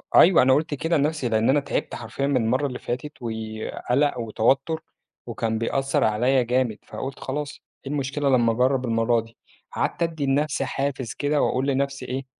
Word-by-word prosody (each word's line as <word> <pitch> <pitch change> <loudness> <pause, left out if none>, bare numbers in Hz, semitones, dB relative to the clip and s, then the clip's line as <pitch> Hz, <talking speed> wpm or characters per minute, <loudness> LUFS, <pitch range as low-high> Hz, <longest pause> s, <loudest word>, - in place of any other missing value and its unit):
أيوه، 180 0 +7
أنا 130 +1 +5
قُلت 150 +2 +1
كده 165 +4 0
لنَفسي، 150 -3 0
لأن 110 0 +2
أنا 140 +2 +5
تعبت 140 - -3
حرفيًا 140 - -3
من 140 -2 +2
المرّة 125 +4 +1
اللي 125 -2 -6
فاتت 130 +4 -5
وي 110 -2 -5
قلق 140 +1 0
وتوتُّر، 135 +8 +1 0.4
وكان 110 -1 -2
بيأثّر 135 +4 0
عليّا 125 +5 +3
جامد، 120 -2 0
فقُلت 135 0 -6
خلاص، 145 +2 -5 0.2
إيه 135 - -4
المشكلة 140 0 -1
لمّا 120 -3 +4
أجرّب 130 +2 +2
المرّة 115 0 +2
دي؟ 115 +1 -17 0.3
قعدت - - -1
أدّي 160 -4 -2
لنَفسي 140 +2 +1
حافز 135 -4 -3
كده، 145 0 0
وأقول 130 +2 +1
لنَفسي 140 -1 -1
إيه، 130 +1 -4
135 Hz, 175 wpm, -24 LUFS, 120-145 Hz, 0.4 s, أيوه